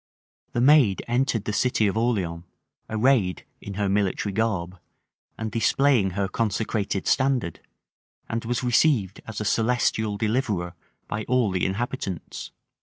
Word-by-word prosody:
The 120 - +1
maid 130 -7 +5
entered 120 -3 0
the 105 - -2
city 125 -1 +2
of 100 - 0
Orleans, 100 -8 0 0.5
arrayed 110 -4 +2 0.2
in 100 - -7
her 100 0 0
military 100 0 0
garb, 95 -5 -1 0.6
and 110 -1 -4
displaying 115 -4 +2
her 100 -1 +1
consecrated 105 -1 -1
standard; 130 - +1 0.7
and 115 0 -3
was 120 +2 -2
received 120 - +2
as 110 -2 -5
a 105 - -3
celestial 110 -1 +1
deliverer 105 -6 -1 0.3
by 105 +1 -3
all 125 -5 +2
the 90 -1 -1
inhabitants. 95 -3 -4
110 Hz, 130 wpm, -25 LUFS, 95-120 Hz, 0.7 s, maid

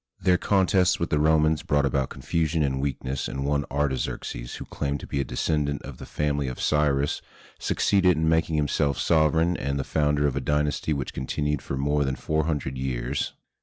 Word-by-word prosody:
Their 90 -1 +3
contests 95 -1 +3
with 85 - -2
the 75 - +2
Romans 80 0 +3
brought 70 -1 +1
about 70 0 0
confusion 80 -2 -1
and 65 -1 0
weakness, 70 -1 -2
and 70 0 -4
one 70 0 +1
Artaxerxes, 65 -3 -2
who - - -7
claimed 70 0 -3
to - - -7
be 70 - -3
a - - 0
descendant 70 +3 -1
of - - -9
the - - -9
family 75 -2 -1
of 65 - -5
Cyrus, 75 -2 +1 0.4
succeeded 95 -4 +2
in 80 0 +1
making 80 0 +2
himself 75 -1 +1
sovereign 80 +2 +3
and 70 0 -2
the 70 - -1
founder 75 0 +1
of 70 - +1
a - - -1
dynasty 75 +1 0
which 70 -3 -2
continued 75 +3 -2
for 70 - -4
more 70 +2 +1
than 65 -1 -1
four 80 +2 -1
hundred 70 -5 -2
years. 65 +1 -2
75 Hz, 190 wpm, -26 LUFS, 70-80 Hz, 0.4 s, Their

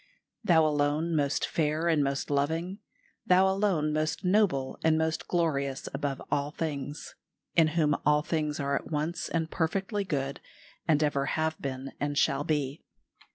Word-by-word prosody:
"Thou 165 -6 +5
alone 150 +2 +1
most 145 -2 +1
fair 155 +1 0
and 160 -4 +3
most 140 +1 -2
loving; 165 +7 -1 0.5
Thou 185 +1 +5
alone 190 -6 +1
most 155 +4 -1
noble 180 -9 +2
and 160 -1 +4
most 160 0 -1
glorious 140 -6 0
above 140 -1 -2
all 140 0 +1
things; 145 -2 -5 0.4
in 165 -2 +6
whom 150 -3 +3
all 150 0 +3
things 155 -3 -1
are 140 0 -1
at - - -4
once 155 +3 -2
and 160 -1 -1
perfectly 190 +5 -1
good, 140 -7 -2 0.5
and 155 -2 +3
ever 140 -2 +1
have 160 +1 -1
been 135 0 -4
and 145 0 -2
shall 140 -2 +2
be. 145 -2 -1
155 Hz, 155 wpm, -29 LUFS, 145-165 Hz, 0.5 s, in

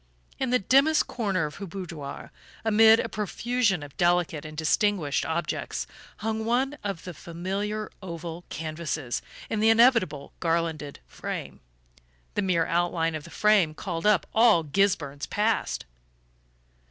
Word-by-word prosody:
In 260 - 0
the 250 - +4
dimmest 275 +8 +4
corner 195 -8 -1
of 150 - -7
her 200 -1 -6
boudoir, 165 -6 -7 0.3
amid 220 +1 +7
a - - -1
profusion 215 -3 0
of 145 -2 -11
delicate 175 -3 +1
and 155 0 -9
distinguished 160 -1 +1
objects, 165 +1 -2 0.3
hung 220 0 -2
one 255 +5 +1
of 195 -5 -4
the 180 - -7
familiar 195 +7 -4
oval 170 -2 -6
canvases, 155 -4 -3 0.3
in 220 - -2
the 220 +1 +4
inevitable 225 - +4
garlanded 165 -4 -1
frame. - - -6 0.7
The - - 0
mere 180 -4 +2
outline 170 -1 0
of 155 -1 -5
the - - -11
frame 200 -7 +3
called 170 +2 -3
up 205 -7 +4
all 220 -7 +5
Gisburn's 150 -4 0
past! 210 - 0
180 Hz, 135 wpm, -27 LUFS, 160-215 Hz, 0.7 s, amid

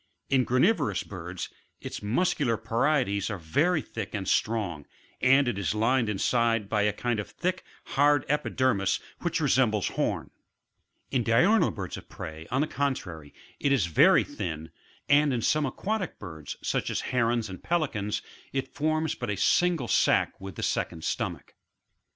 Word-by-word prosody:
In 130 -2 +4
granivorous 130 - +2
birds 90 -2 -6 0.3
its - - -6
muscular 120 - +1
parietes 115 -2 +1
are 105 - -3
very 150 - +1
thick 115 - -6
and 100 -2 -3
strong, 95 -10 0 0.3
and 135 +2 +5
it 110 -5 -1
is 100 +2 -1
lined 115 +1 +2
inside 115 +1 +1
by 105 0 +1
a 105 0 +3
kind 120 +1 -2
of 105 - -5
thick, 185 +1 -2 0.2
hard 145 0 +3
epidermis 130 -8 +1 0.2
which - - -1
resembles - - +2
horn; - - -2 0.8
in 130 - +2
diurnal 165 - +4
birds 95 -4 -5
of - - -12
prey, 80 +1 -8
on 130 - +1
the 155 - +1
contrary, 90 - -3 0.3
it 140 - +1
is 130 -10 +3
very 80 -2 +5
thin, 80 -1 -5 0.4
and 145 0 +4
in 120 -3 -1
some 150 -2 +2
aquatic 195 - -3
birds, 80 -7 -8
such - - -1
as - - -1
Herons 120 -2 0
and 95 -2 -9
Pelicans, 125 -12 -1 0.3
it 135 0 -3
forms 155 +1 0
but - - -5
a 100 - -1
single 175 -8 +2
sack - - +2
with 95 -2 -7
the - - -5
second 80 -1 -1
stomach. - - -3
115 Hz, 155 wpm, -28 LUFS, 100-145 Hz, 0.8 s, and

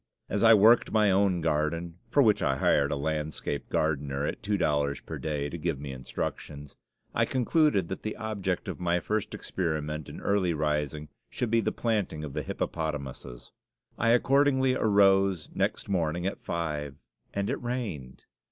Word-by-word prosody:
As 105 - -1
I 115 -1 +8
worked 110 +3 +5
my 105 -2 +4
own 95 -2 +2
garden 80 +2 -1
(for 140 - +4
which 110 -3 +3
I 70 - +2
hired 70 +2 +2
a - - +1
landscape 75 0 -3
gardener 75 -2 0
at - - -4
two 105 -1 0
dollars 75 -4 +1
per - - -7
day 75 -2 -2
to 85 +3 -6
give 80 -4 -2
me 70 -1 -6
instructions), 70 +2 -6 0.4
I - - +2
concluded 130 - +2
that 95 - -5
the 110 - -4
object 100 -4 -3
of - - -5
my 90 0 +1
first 105 +4 -2
experiment 75 -4 -3
in - - -8
early 95 -4 +1
rising 75 0 -1 0.2
should 120 -3 -3
be 115 0 +4
the - - 0
planting 105 -9 -1
of 75 -3 -6
the - - -2
hippopotamuses. 70 -6 -5 0.4
I 115 - +1
accordingly 130 +2 +4
arose 100 -6 +3
next - - -1
morning 85 -3 -1
at 95 - -3
five, 75 -4 -3 0.4
and 100 0 -2
it - - -2
rained! 105 - -4
85 Hz, 165 wpm, -28 LUFS, 75-105 Hz, 0.4 s, I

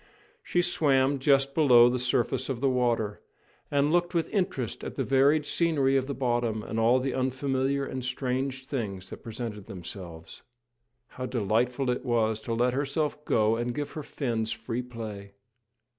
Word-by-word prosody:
She 175 - 0
swam 140 -5 +2
just 135 0 +3
below 125 -6 +7
the 125 +1 0
surface 125 +1 0
of 130 -3 -2
the 135 0 +2
water, 120 -4 0 0.5
and 145 +1 +2
looked 175 +1 +1
with 165 - +1
interest 180 - -1
at - - -6
the - - -1
varied 140 +3 +3
scenery 145 -5 +2
of 135 -1 +1
the 140 - -3
bottom 120 -4 0
and 115 - -3
all 120 +3 +4
the 130 0 -2
unfamiliar 130 +1 0
and 130 -1 -5
strange 130 +1 -2
things 100 -9 -4
that - - -8
presented 110 -3 -6
themselves. 85 -2 -9 0.7
How 130 0 -6
delightful 125 +3 0
it 125 - -3
was 110 -3 +1
to 115 - -3
let 125 +2 +2
herself 145 +2 -1
go 110 0 +3
and 120 +1 -2
give 145 -1 -3
her 155 - -5
fins 115 -6 -2
free 115 +2 -3
play! 110 -5 -8
125 Hz, 165 wpm, -28 LUFS, 115-140 Hz, 0.7 s, below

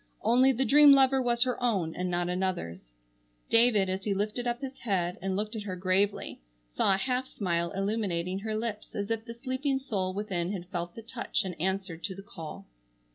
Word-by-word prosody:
Only 250 +5 +5
the 265 +1 0
dream 290 +1 +8
lover 270 -1 +5
was 240 -1 +2
her 250 -1 -2
own 195 -10 0
and 180 0 -2
not 175 0 0
another's. 180 - -3 0.6
David, 230 -4 +5
as 190 +1 -2
he 200 -1 0
lifted 210 +5 -2
up 240 0 -1
his 270 -1 -6
head 185 -6 -1
and 190 0 -1
looked 210 +3 -2
at 220 - -3
her 195 -3 -5
gravely, 185 - 0 0.3
saw 190 - +3
a - - -1
half 255 +5 0
smile 170 -6 -1
illuminating 195 -3 -1
her 215 +1 -3
lips 215 -2 -5
as 205 +2 -3
if 225 0 -2
the 230 -1 -8
sleeping 265 +3 -1
soul 200 -8 -2
within 195 -3 -2
had 180 -3 -6
felt 175 -1 -4
the 225 - -9
touch 230 +2 -2
and 185 - -3
answered 190 -2 -2
to 190 - -4
the 195 - -10
call. 160 - -9
205 Hz, 200 wpm, -29 LUFS, 185-235 Hz, 0.6 s, dream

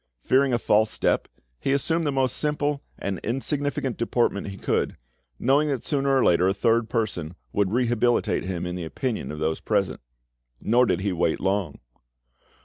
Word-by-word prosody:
Fearing 135 +1 +3
a 120 - +3
false 110 -1 +3
step, - - 0 0.3
he 135 - 0
assumed 160 +3 +1
the - - +1
most 135 -2 +1
simple 150 -1 0 0.2
and 95 -2 -3
insignificant 135 +1 -2
deportment 115 -3 0
he 100 -1 -7
could, - - -1 0.4
knowing 140 +4 +3
that 135 -5 -2
sooner 140 -2 0
or 130 - +3
later 90 +1 +4
a 95 - +1
third 115 +1 +2
person 90 -8 -2 0.2
would 100 -2 +2
rehabilitate 120 0 +1
him 90 -2 -3
in 90 - -3
the 90 - -4
opinion 115 - -3
of 75 - -6
those 80 +1 -1
present. - - -1 0.6
Nor 120 - +3
did 90 - +1
he 100 0 0
wait 85 -2 0
long. 95 -1 -1
115 Hz, 170 wpm, -25 LUFS, 95-135 Hz, 0.6 s, later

